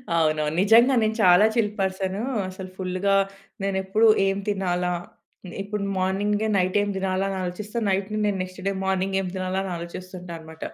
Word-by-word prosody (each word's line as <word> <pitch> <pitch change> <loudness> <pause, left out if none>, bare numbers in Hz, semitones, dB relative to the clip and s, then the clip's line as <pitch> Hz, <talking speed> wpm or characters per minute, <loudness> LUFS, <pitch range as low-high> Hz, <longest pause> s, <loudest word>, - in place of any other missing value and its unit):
అవునవును. 155 -1 +1
నిజంగా 230 +6 +6
నేను 220 0 0
చాలా 180 +3 +7
చిల్ 215 -3 +2
పర్సను. 190 +1 -1 0.3
అసలు 185 0 -8
ఫుల్‌గా 185 +1 0 0.5
నేనెప్పుడు 195 +3 +2 0.2
ఏం 195 0 0
తినాలా? 180 -3 0 0.7
ఇప్పుడు 205 0 -4
మార్నింగే 205 +3 0
నైటేం 190 +3 +1
దినాలా 190 0 0
అని 195 - -3
ఆలోచిస్తా, 205 +5 -5
నైట్‌ని 195 +2 -1
నేను 205 -2 0
నెక్స్ట్ 185 +1 -10
డే - - +2
మార్నింగ్ 190 0 0
ఏం 185 - -4
తినాలా 185 0 -1
అని 190 - -4
ఆలోచిస్తుంటా 180 +1 -8
అన‌మాట. 160 0 -11
190 Hz, 150 wpm, -24 LUFS, 185-200 Hz, 0.7 s, చాలా